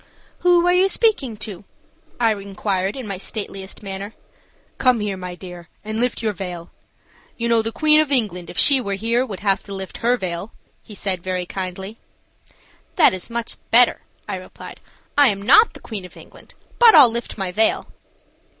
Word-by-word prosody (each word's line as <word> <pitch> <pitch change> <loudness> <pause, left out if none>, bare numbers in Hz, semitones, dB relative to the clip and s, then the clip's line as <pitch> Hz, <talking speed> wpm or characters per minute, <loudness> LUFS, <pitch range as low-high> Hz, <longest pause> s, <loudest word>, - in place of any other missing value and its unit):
"Who 350 -1 +3
are 355 - +4
you 370 +2 +3
speaking 310 - +1
to?" 205 -4 -9 0.6
I 225 -2 +3
inquired, 195 0 -3
in 260 - -6
my 195 -3 -5
stateliest 195 -1 -6
manner. 195 +2 -7 0.6
"Come 255 -3 +3
here, 210 -2 -3
my 180 -1 -7
dear, 175 -2 -11 0.2
and 215 +1 -4
lift 245 -1 -1
your 215 -1 0
veil. 180 -3 -7 0.7
You 235 - -2
know 230 -1 +3
the 225 +1 -3
Queen 305 +5 +4
of 300 -2 -3
England, 195 -10 0
if - - -10
she 275 -3 +7
were 200 -4 -3
here, 230 +5 0
would 205 -7 -7
have 195 -2 +1
to 200 - -9
lift 190 -1 -7
her 245 +2 +1
veil," 185 0 -5 0.3
he 210 - -13
said, 190 -3 -2
very 185 0 -3
kindly. 190 +4 -6 1.0
"That 330 - +5
is 185 +3 -5
much 235 0 -4
better," 240 +1 +5 0.3
I - - -3
replied. - - -12 0.4
"I 285 - +7
am 200 -4 0
not 275 - +5
the - - -9
Queen 210 -5 -7
of 180 - -13
England, - - -16 0.2
but 470 -5 +8
I'll 270 -7 +8
lift 235 0 -5
my 190 -3 -3
veil." 220 +4 +1
210 Hz, 185 wpm, -21 LUFS, 190-245 Hz, 1.0 s, but